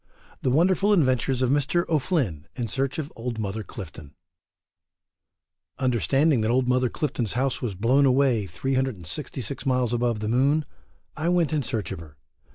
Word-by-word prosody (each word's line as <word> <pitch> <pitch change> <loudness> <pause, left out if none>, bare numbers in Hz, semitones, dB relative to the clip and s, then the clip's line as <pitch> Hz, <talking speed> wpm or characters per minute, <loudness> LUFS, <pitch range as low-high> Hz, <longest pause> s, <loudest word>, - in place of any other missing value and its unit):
THE - - +1
WONDERFUL 185 +8 +3
Adventures 130 - +2
of 125 - +2
Mr. 145 +5 +1
O'Flynn 135 - 0
in 120 - -2
Search 135 +4 -2
OF 155 -2 -5
OLD 115 0 -4
MOTHER 110 0 -3
CLIFTON. 80 -8 -10 1.6
Understanding 130 - +2
that 110 - 0
old 125 +1 +2
Mother 125 0 +2
Clifton's 120 -7 -2
house 130 +1 -1
was 110 -6 -3
blown 130 +8 +3
away 130 -6 +2
366 130 - -3
miles 125 -2 +1
above 120 -2 0
the 105 - -3
moon, 140 +6 +2 0.5
I 160 +3 -1
went 175 -4 +2
in 150 - +1
search 115 -6 -3
of - - -5
her. 75 -3 -13
130 Hz, 155 wpm, -25 LUFS, 110-140 Hz, 1.6 s, WONDERFUL